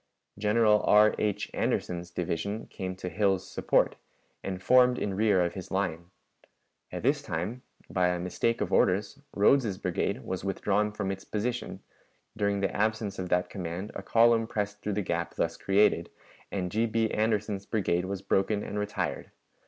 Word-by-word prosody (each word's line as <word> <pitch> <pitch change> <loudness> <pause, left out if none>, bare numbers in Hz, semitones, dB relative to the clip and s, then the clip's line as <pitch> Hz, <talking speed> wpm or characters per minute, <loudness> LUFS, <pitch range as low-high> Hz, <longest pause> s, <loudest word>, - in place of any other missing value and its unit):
General 105 0 +4
R, 105 +1 +6
H. 105 -2 -1
Anderson's 85 0 -1
division 90 +5 -3
came 95 -1 -5
to 90 - -6
Hill's 95 -1 +1
support, - - +1 0.5
and 95 -1 -4
formed 125 +4 +5
in 100 - -2
rear 100 -3 +3
of 85 - -3
his 95 - -7
line. 90 -3 -2 0.8
At - - -5
this - - +2
time, 95 +10 -4 0.3
by 90 -1 +1
a 90 0 0
mistake 105 +6 -1
of - - -2
orders, 100 +7 +2 0.2
Rodes's 105 -1 +3
brigade 65 - -2
was 95 0 -4
withdrawn 100 +2 0
from 100 -2 -3
its 95 0 -6
position; 120 +3 -3 0.5
during 100 -2 0
the 100 - -1
absence 110 -2 -1
of 90 -1 -4
that 90 +2 +1
command 90 +1 -5
a - - -5
column 115 +2 +4
pressed 105 -2 -3
through 105 - -2
the 105 +1 -1
gap - - -2
thus - - -1
created, 100 +2 +2 0.4
and 90 -3 -2
G. 115 +4 +1
B. 110 0 0
Anderson's 105 -2 -1
brigade 95 -5 0
was 95 0 -4
broken 100 +1 +1
and 105 - -4
retired. 105 0 -3
100 Hz, 165 wpm, -29 LUFS, 95-110 Hz, 0.8 s, R